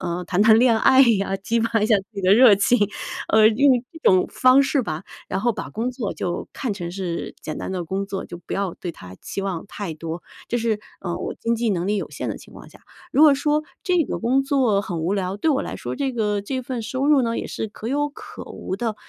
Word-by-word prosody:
呃， 175 +1 -3
谈 185 +2 +2
谈 220 0 +6
恋 235 -2 +4
爱 260 +4 +5
呀， 205 -7 +3
激 230 +4 0
发 230 -1 +1
一 210 - +2
下 220 - +5
自 195 - -4
己 200 - -5
的 190 +1 +5
热 235 -2 +8
情， 200 +5 +3 0.6
呃， 215 0 +7
用 250 +2 +3
这 325 - -12
种 185 -1 +4
方 255 +2 +5
式 275 0 +1
吧。 155 -7 -4 0.3
然 - - -2
后 240 +3 +2
把 225 - -5
工 230 +4 -2
作 240 -4 -4
就 175 - -4
看 235 -7 -3
成 175 -3 -6
是 180 -3 -4
简 155 - -6
单 - - -5
的 175 -3 -3
工 195 +3 -2
作， 195 -1 -5
就 175 - -8
不 175 - -10
要 195 -3 -2
对 175 - -6
它 90 - -12
期 - - -4
望 190 -4 -3
太 195 -5 -6
多， 165 +2 -6 0.2
这 240 - -1
是， 225 -2 0 0.2
呃， 175 -2 -3
我 - - -4
经 230 0 0
济 230 -1 0
能 180 -2 -1
力 210 - +1
有 200 - -4
限 - - -5
的 - - -3
情 - - -14
况 - - -12
下。 - - -18 0.3
如 295 - +4
果 300 -2 +8
说 300 +2 0 0.2
这 360 -2 +2
个 - - -4
工 255 +4 +2
作 260 -8 +2
很 175 -4 -4
无 175 +5 0
聊， 190 0 -2
对 320 - +2
我 275 -2 +1
来 - - -5
说 - - -5
这 275 -2 -1
个 210 -3 -1
这 260 +5 -3
份 245 -2 -5
收 260 +4 -2
入 290 -3 +5
呢， 230 0 -1
也 - - -4
是 - - -4
可 215 +1 -7
有 290 +2 0
可 420 +6 -10
无 190 - -6
的， 225 +1 -2
220 Hz, 275 characters per minute, -22 LUFS, 190-255 Hz, 0.6 s, 热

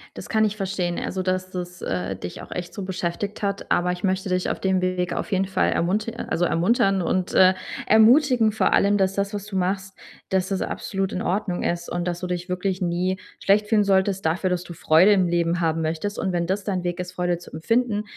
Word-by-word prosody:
Das - - -8
kann 220 -1 +2
ich 210 0 -2
verstehen, 185 -3 -2
also, 190 - -3
dass 185 0 -2
das, 180 -1 -6
äh, 90 +1 -2
dich 90 -1 -7
auch - - -12
echt 175 -1 -5
so 205 - -6
beschäftigt 185 +2 -3
hat. 200 0 -3
Aber 180 0 +2
ich 180 - -6
möchte 190 0 0
dich 180 0 0
auf - - -3
dem 190 -1 +1
Weg 185 -1 -1
auf - - -4
jeden 190 0 +2
Fall 190 - +1
ermunti 205 +6 0
also, 175 -6 -1
ermuntern 195 +2 +2
und, 180 +1 -1
äh, 185 0 +6 0.3
ermutigen, 235 +1 +5
vor 220 - +1
allem, 205 +1 +4
dass 190 0 +1
das, 200 +1 -2
was 205 -1 -4
du 205 -2 -7
machst, 190 +1 -1 0.3
dass 190 -1 +1
das 195 - -1
absolut 195 -1 -3
in 185 - -3
Ordnung 185 -1 -1
ist 170 0 -2
und 175 0 -2
dass 175 -1 -2
du 180 - -4
dich 180 0 -4
wirklich 185 +1 -2
nie 180 +1 0 0.2
schlecht 210 +1 +3
fühlen 215 -1 +3
solltest 195 -1 +1
dafür, 175 +4 +1
dass 180 -1 -1
du 175 - -9
Freude 165 +5 +5
im 190 -3 +3
Leben 170 0 +1
haben 165 0 +1
möchtest. 165 +6 -2
Und 190 - -1
wenn 170 -1 -1
das 195 +2 -1
dein 190 -3 -2
Weg 175 0 -3
ist, 180 0 -4
Freude 175 -1 0
zu 175 - -14
empfinden, 215 +6 0
185 Hz, 230 wpm, -23 LUFS, 175-200 Hz, 0.3 s, äh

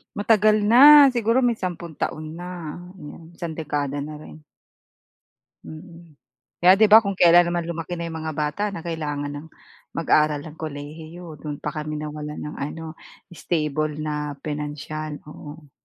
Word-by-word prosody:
Matagal 215 0 +3
na, 285 +5 +9
siguro 240 -1 +1
may 245 -3 +2
sampung 170 -4 -6
taon 155 +2 -4
na. 175 -3 -7 0.2
Oo 160 +3 -11
isang 170 -2 -6
dekada 145 -2 -3
na 150 0 -8
rin. 155 0 -13 1.2
Mm 165 -2 -13 0.4
kaya 185 +2 +7
'di 220 - +6
ba 225 - +10
kung 200 -3 -4
kailan 175 0 +6
naman 175 -1 -2
lumaki 170 +1 -5
na 170 - -4
yung 160 -1 -6
mga 155 -1 -5
bata 150 +7 -1
na 195 -5 -8
kailangan 145 -3 -4
ng 145 +2 -8 0.5
mag-aral 150 -3 +2
ng 155 - -9
kolehiyo 155 +3 -8
dun 150 -1 -5
pa 150 - -5
kami 150 0 -4
nawalan 150 0 -6
ng 150 - -6
ano 160 +2 -6 0.4
stable 155 -3 -2
na 150 -2 -4
pinansiyal, 150 0 -5
oo. 150 0 -12
155 Hz, 150 wpm, -23 LUFS, 150-175 Hz, 1.2 s, ba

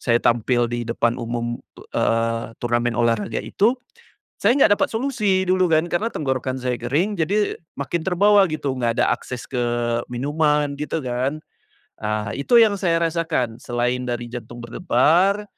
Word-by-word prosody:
saya 120 -1 +2
tampil 120 0 +2
di 120 0 -3
depan 120 0 0
umum, 120 0 -3 0.4
eee, 115 0 0
turnamen 120 0 0
olahraga 115 -2 0
itu, 225 +6 +1 0.7
saya 230 +6 +3
enggak 205 -7 +5
dapat - - +3
solusi 220 -6 0
dulu 185 0 +2
kan, 160 0 +4
karena 190 +6 0
tenggorokan 130 -2 -2
saya 125 -1 -1
kering 160 - 0
jadi 200 +6 0 0.2
makin 160 +5 -2
terbawa 200 +2 +5
gitu, 145 -3 -2
enggak 120 -3 0
ada - - +3
akses 125 -2 -7
ke 125 - -2 0.5
minuman 150 +2 +1
gitu 150 +2 -2
kan, 130 +4 -2 0.6
ah, 105 -1 -2
itu 190 - +2
yang 215 - +4
saya 170 -3 +1
rasakan 160 -9 -1
selain 125 +1 -1
dari 120 0 -2
jantung 120 0 -8
berdebar, 175 - +2
135 Hz, 150 wpm, -22 LUFS, 120-180 Hz, 0.7 s, enggak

